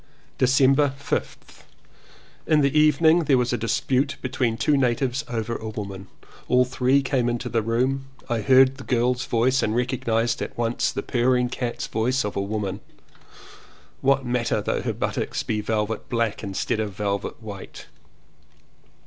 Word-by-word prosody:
December 135 +2 +4
5th. 140 - -4 0.9
In 155 -1 +4
the 140 +1 +1
evening 155 +2 +4
there 140 -3 +4
was 125 0 0
a - - +3
dispute 130 +5 0
be 130 - -4
tween 115 -2 0
two 150 - +2
natives 130 +1 0
over 115 -1 -2
a 110 - -5
woman. 100 -3 -7 0.4
All 125 0 +4
three 130 +2 +2
came 130 -3 0
into 120 +1 -3
the 115 -1 +1
room. 130 +5 0 0.2
I 120 -3 -1
heard 130 +2 +5
the 135 - -9
girl's 125 0 0
voice 125 +3 +2
and 110 +1 0
recognized 120 -2 0
at - - -5
once 120 0 0
the - - -4
pur 125 0 +1
ring 125 -1 +1
cat's 120 -1 -3
voice 125 +4 0
of 105 - -4
a 100 - 0
woman. 100 -1 -3 1.2
What 135 0 +2
matter 120 -2 0
though 105 - -1
her - - -2
buttocks - - -2
be 105 -1 -2
velvet 110 0 -2
black 115 -3 -1
instead 100 +2 -2
of 105 -2 -2
velvet 100 -1 -3
white? 105 -4 -9
120 Hz, 160 wpm, -24 LUFS, 110-135 Hz, 1.2 s, heard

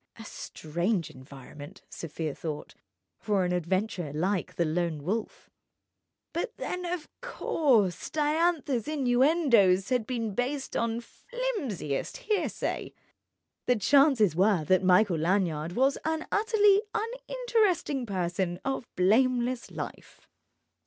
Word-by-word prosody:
A 225 - -11
strange 175 +1 -3
environment 140 +2 -12
(Sofia 160 -2 -5
thought) 150 -1 -6 0.5
for 205 -4 +1
an 180 - -1
adventurer 180 -1 -1
like 180 +5 -1
the 170 - +1
Lone 160 -2 -1
Wolf. 210 +7 -4 0.8
But 340 - -3
then—of 360 -2 -4
course!—Diantha's 295 - +1
innuendoes 250 - +3
had 250 -4 0
been 230 -4 -2
based 265 +5 -2
on 230 0 0
flimsiest 320 - -4
hearsay. 435 -4 -2 0.7
The 250 - +4
chances 245 - +4
were 190 -2 +3
that 185 +5 +3
Michael 185 -1 +4
Lanyard 170 -2 0
was 265 +6 +2
an 320 0 -1
utterly 415 -2 +4
uninteresting 450 - 0
person 175 -2 -2
of 270 -3 -2
blameless 245 +5 +2
life. - - -8
225 Hz, 105 wpm, -28 LUFS, -, 0.8 s, The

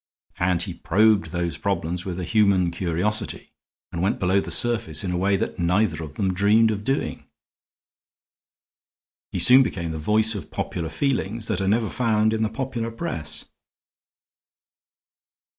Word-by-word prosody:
And 90 -1 +1
he 95 -2 -5
probed 100 +2 +2
those 85 +1 -3
problems 90 -3 -2
with 90 -1 -4
a - - -3
human 95 -2 +2
curiosity, 95 +5 -2 0.4
and 85 - -4
went 95 - +1
below 95 +2 +2
the - - -7
surface 110 -10 0
in 90 - -2
a - - -1
way 100 +2 +2
that 95 - -4
neither 90 0 +1
of 75 -1 -9
them 95 -2 0
dreamed 105 +4 +4
of 105 -1 -4
doing. 135 +5 -2 2.0
He - - -3
soon 130 +2 +7
became 85 -10 -2
the 80 - -5
voice 110 +7 +2
of 100 -7 -7
popular 85 -3 -4
feelings 115 - -1
that - - 0
are 95 - -1
never 110 +2 +2
found 110 -3 +1
in 110 - -1
the 110 - +1
popular 115 0 -3
press. 80 - -4
100 Hz, 155 wpm, -24 LUFS, 85-110 Hz, 2.0 s, soon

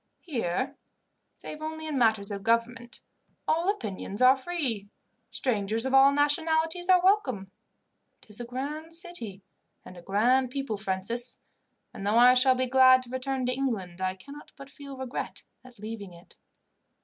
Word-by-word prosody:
Here, 255 - -3 0.6
save 305 - -9
only 315 0 -5
in 310 -2 -3
matters 220 -5 +2
of 200 -1 -4
government, 235 +3 -1 0.5
all 335 +4 +1
opinions 210 - -4
are 255 +1 +7
free, 260 - -3 0.4
strangers 225 -1 -1
of 265 - -2
all 270 +1 +7
nationalities 320 +4 +1
are 365 -1 +5
welcome. 255 - +1 0.7
It - - -18
is 210 - -8
a 240 - -5
grand 295 +7 -5
city 330 - -4 0.4
and 185 - -11
a 175 - -11
grand 240 +8 +2
people, 270 -5 -3
Francis, 215 +5 -3 0.6
and - - -8
though 210 +3 +2
I 245 +1 +8
shall 255 +1 +5
be 255 0 0
glad 255 0 +6
to 245 - -7
return 260 0 -2
to 250 - 0
England 205 -10 -3
I 185 0 -1
cannot 280 +10 -13
but 275 0 -12
feel 280 -2 -10
regret 260 0 -5 0.2
at 255 -2 -16
leaving 210 -3 -8
it. 170 +3 -18
255 Hz, 160 wpm, -27 LUFS, 215-280 Hz, 0.7 s, I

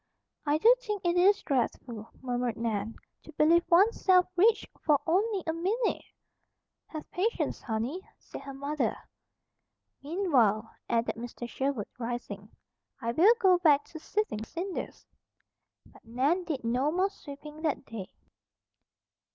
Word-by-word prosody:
"I 295 +1 +3
do 460 +9 +6
think 420 -6 -4
it 345 0 +2
is 390 +3 +4
dreadful," 240 -4 -2
murmured 245 -2 -1
Nan, 225 -1 -2 0.3
"to - - -13
believe 330 +4 +4
one's 390 +7 +4
self 365 -2 +6
rich 430 +5 +4 0.2
for 295 -3 +4
only 390 +3 +1
a 320 - -1
minute!" 405 +8 0 0.9
"Have 310 -1 -7
patience, 435 +6 -1
honey," 245 +8 -3 0.2
said - - -10
her 275 - -8
mother. 285 +2 -1 1.0
"Meanwhile," 265 - +1 0.2
added 235 0 +1
Mr. 240 +1 -6
Sherwood, 265 -4 -2
rising, 230 -4 -5 0.5
"I 230 -2 -2
will 380 - +6
go 370 -5 +5
back 295 -5 +4
to 320 - -9
sifting 355 - -2
cinders." 350 - -5 0.8
But - - -20
Nan 275 +10 0
did 300 -7 -3
no 250 +6 +1
more 375 +4 +1
sweeping 300 -3 -11
that 305 -4 -1
day. 210 -5 -7
300 Hz, 135 wpm, -29 LUFS, 240-365 Hz, 1.0 s, do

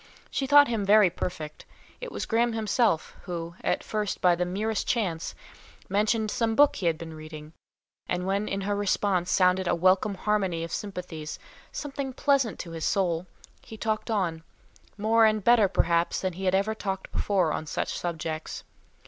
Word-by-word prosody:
She 270 - -1
thought 285 +1 +7
him 225 -3 -1
very 205 -2 +5
perfect; 155 -4 -5 0.4
it - - -7
was - - -4
Graham 235 +1 +1
himself, 220 -4 +1
who, 170 -1 -5
at - - 0
first 210 -2 -2
by 180 -1 +4
the 180 +1 0
merest 210 +4 -2
chance, 185 -9 -1 0.5
mentioned 215 +2 +1
some 225 -1 0
book 290 +2 +5
he 185 - -1
had 165 -1 +1
been 160 -1 -8
reading, 155 0 -10 0.6
and 180 0 -1
when 200 +2 0
in 195 - -2
her 205 +1 -1
response 195 -3 0
sounded 185 0 +3
a - - +2
welcome 185 +3 +3
harmony 190 -4 0
of 165 - -6
sympathies, 180 -7 -5 0.3
something, 275 -2 -5
pleasant 270 -4 +1
to 170 - -9
his 165 -1 -5
soul, 180 -3 0 0.3
he 220 - -11
talked 220 +1 -2
on, 180 -7 -1 0.6
more 225 +2 +3
and 215 -1 0
better 235 -2 +5
perhaps 170 -2 +1
than 185 -2 -1
he 190 +3 -6
had 185 0 +3
ever 200 +3 +1
talked 195 -3 -4
before 185 -6 +1
on 155 - -4
such - - -2
subjects. 160 -2 -4
195 Hz, 175 wpm, -27 LUFS, 170-220 Hz, 0.6 s, thought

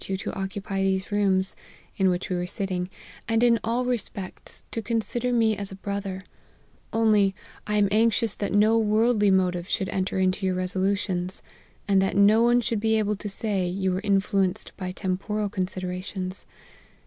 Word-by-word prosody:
you 190 - -1
to - - -5
occupy 195 0 -3
these 190 0 0
rooms,' 195 -2 +1 0.4
in 190 -1 +3
which 180 0 -1
we 185 - -2
were 180 0 -2
sit 195 +2 -3
ting, 180 -1 -2 0.2
' - - -20
and 225 +1 +2
in 235 -1 +5
all 235 +3 0
respects, 210 -6 -4
to 225 - -3
consider 235 +2 -1
me 225 -2 +3
as 200 -1 -2
a - - -7
bro 200 +1 -3
ther: 190 -1 -6 0.7
only 210 -4 +3 0.3
I 210 - 0
am 205 -1 +4
anxious 225 0 +2
that 200 - -2
no 215 +3 +4
worldly 215 0 +3
motive 180 -1 +1
should 190 -3 0
enter 190 0 -1
into 185 +1 +1
your 185 -1 +1
resolutions, 185 0 -1 0.4
and 195 -1 +4
that 195 0 0
no 210 +3 +6
one 240 +1 +4
should 230 -2 -1
be 220 +1 +2
able 210 -1 +1
to 205 - -5
say, 195 -2 0
you 190 +1 -1
were 185 +1 -1
influenced 195 -1 0
by 185 -1 -4
tem 185 0 -2
poral 210 0 -2
considerations.' 185 -1 -4
195 Hz, 185 wpm, -25 LUFS, 190-215 Hz, 0.7 s, no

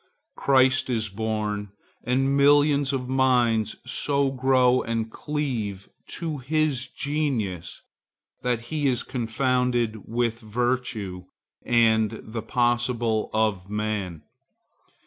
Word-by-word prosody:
Christ 130 0 +3
is 110 -3 -1
born, 105 -1 -3 0.3
and 135 +3 +1
millions 145 0 +4
of 130 -2 -2
minds 125 -5 +2
so 140 -1 0
grow 130 -1 +3
and 115 -1 -2
cleave 120 -12 -3 0.3
to 160 -4 -3
his 145 -1 0
genius 125 - -3 0.6
that 120 -2 0
he 150 -2 +1
is 125 -3 0
confounded 120 -2 -1
with 115 0 -1
virtue 110 -5 -2 0.4
and 110 -2 +3
the 110 +1 -5
possible 120 -1 0
of 105 -4 0
man. 105 -6 -3
120 Hz, 100 wpm, -25 LUFS, 110-130 Hz, 0.6 s, millions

